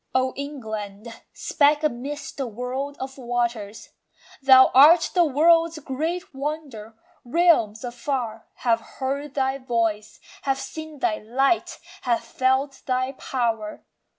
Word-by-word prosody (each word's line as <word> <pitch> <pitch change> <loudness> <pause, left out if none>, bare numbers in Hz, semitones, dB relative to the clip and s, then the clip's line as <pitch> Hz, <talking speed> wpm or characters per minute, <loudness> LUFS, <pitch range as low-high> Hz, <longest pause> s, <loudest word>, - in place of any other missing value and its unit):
O 260 0 +2
England, 220 -6 -6 0.2
speck 295 +1 +2
amidst 285 +1 -3
the 270 -3 -2
world 255 +5 -4
of 265 +1 -7
waters! 235 -4 -3 0.5
Thou 260 -1 +7
art 315 +6 +7
the 355 - +5
world's 330 +3 +3
great 315 +6 -4
wonder. 270 -6 -5 0.3
Realms 245 -7 +2
afar 240 -2 -4 0.2
Have 230 -1 +3 0.2
heard 275 +1 -3
thy 265 0 0
voice, 225 -4 -2 0.2
have 270 -1 0
seen 310 +3 -8
thy 215 -5 0
light, 270 +10 0 0.2
have 235 -2 0
felt 265 +3 0
thy 255 0 0
power. 230 -5 -3
260 Hz, 120 wpm, -24 LUFS, 235-285 Hz, 0.5 s, Thou